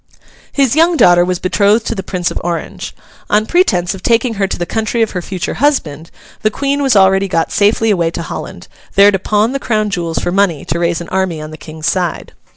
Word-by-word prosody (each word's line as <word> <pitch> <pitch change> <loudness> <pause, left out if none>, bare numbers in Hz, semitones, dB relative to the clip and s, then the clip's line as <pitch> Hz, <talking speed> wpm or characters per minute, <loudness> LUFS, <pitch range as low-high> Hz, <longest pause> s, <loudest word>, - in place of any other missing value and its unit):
His 275 -3 +1
young 330 +2 +3
daughter 175 -7 +5
was 180 0 -1
betrothed 205 +5 +1
to - - -1
the 195 - -4
Prince 180 -2 -3
of - - -4
Orange. 170 -1 -5 0.3
On 210 +1 +2
pretence 195 - +1
of 190 - -9
taking 235 +2 +1
her 195 - +2
to - - -4
the 175 - -2
country 225 +3 -1
of 220 - -2
her 180 - -3
future 185 0 -4
husband, 170 - -1 0.3
the 215 - +2
Queen 280 +5 -1
was 270 -5 +2
already 195 0 +4
got 165 -3 -1
safely 215 +2 +2
away 170 -4 +1
to 170 0 -5
Holland, - - -7 0.3
there 200 +1 +7
to 195 - -1
pawn 210 +4 +1
the 275 - -2
Crown 215 -4 -1
jewels 170 -4 -3
for - - -1
money 185 -5 +1
to 165 +3 -2
raise 170 -1 0
an 170 - -8
army 190 -4 -1
on 155 0 -8
the - - -8
King's 155 0 -9
side. 180 -1 -2
195 Hz, 225 wpm, -15 LUFS, 175-220 Hz, 0.3 s, there